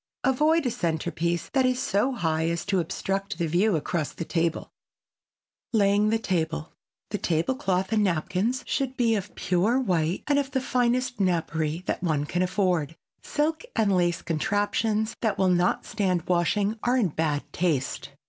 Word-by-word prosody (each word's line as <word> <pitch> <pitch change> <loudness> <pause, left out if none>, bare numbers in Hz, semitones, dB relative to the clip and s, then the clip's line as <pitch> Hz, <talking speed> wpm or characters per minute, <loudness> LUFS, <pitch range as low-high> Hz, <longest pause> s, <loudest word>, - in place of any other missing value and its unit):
Avoid 300 +4 +3
a 250 - +1
centerpiece 170 -1 -1
that 265 -1 +2
is 255 0 +1
so 205 +6 +1
high 160 -6 0
as 170 -1 -2
to 195 -2 +1
obstruct 195 +3 -2
the 170 - 0
view 180 +5 +2
across 155 0 -2
the 165 - -5
table. 165 -1 -1 1.0
[Sidenote: 225 - +2
LAYING 205 +1 +3
THE 225 - +2
TABLE] 165 - -2 0.4
The - - 0
table 165 +9 +1
cloth 190 -5 -1
and 215 -1 +3
napkins 190 +7 0
should 265 -1 -2
be 235 -2 +3
of 205 -2 -3
pure 195 +8 +1
white 175 -7 0
and 285 -1 +3
of 275 -1 -2
the 265 -1 0
finest 250 -1 0
napery 165 -3 0
that - - -2
one 155 -5 0
can 175 +4 -1
afford. 180 -4 0 0.3
Silk 310 +4 -1
and 200 -3 +3
lace 175 -1 +1
contraptions 210 +5 0
that 215 -3 0
will 190 -1 +3
not 180 0 +2
stand 185 -5 0
washing 200 +5 +1
are 245 +2 +2
in 215 -8 +2
bad 150 -2 -1
taste. 155 -7 -1
190 Hz, 165 wpm, -26 LUFS, 170-225 Hz, 1.0 s, Avoid